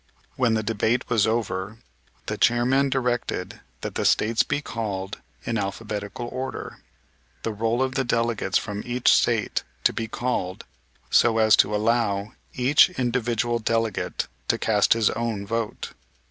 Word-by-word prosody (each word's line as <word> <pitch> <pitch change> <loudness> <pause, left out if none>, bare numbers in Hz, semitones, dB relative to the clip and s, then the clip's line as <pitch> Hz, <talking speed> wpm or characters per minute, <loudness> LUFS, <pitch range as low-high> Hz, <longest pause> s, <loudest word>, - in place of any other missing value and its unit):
When 120 -3 +2
the 110 - 0
debate 115 +3 0
was 110 -3 +3
over 110 -2 -2 0.5
the - - -2
chairman 125 +4 +3
directed 125 -2 -2 0.2
that - - -4
the - - -2
States 110 +1 +3
be 145 - 0
called 105 -7 -4 0.3
in 115 -2 -1
alphabetical 105 +3 -4
order, 130 +1 -5 0.6
the 115 - -2
roll 115 +4 0
of 130 0 -2
delegates 115 -5 +1
from 105 -1 -4
each 125 0 +1
State 115 -3 +2 0.2
to - - +3
be 115 - -3
called, 110 -6 -3 0.5
so 115 -1 +4
as 110 -1 +6
to 105 +2 +3
allow 105 -2 0 0.2
each 135 +7 +5
individual 120 -1 0
delegate 115 -2 -1 0.2
to - - +2
cast 105 -2 +3
his 115 -2 +2
own 110 -3 -3
vote. 115 +1 -3
115 Hz, 140 wpm, -24 LUFS, 105-120 Hz, 0.6 s, as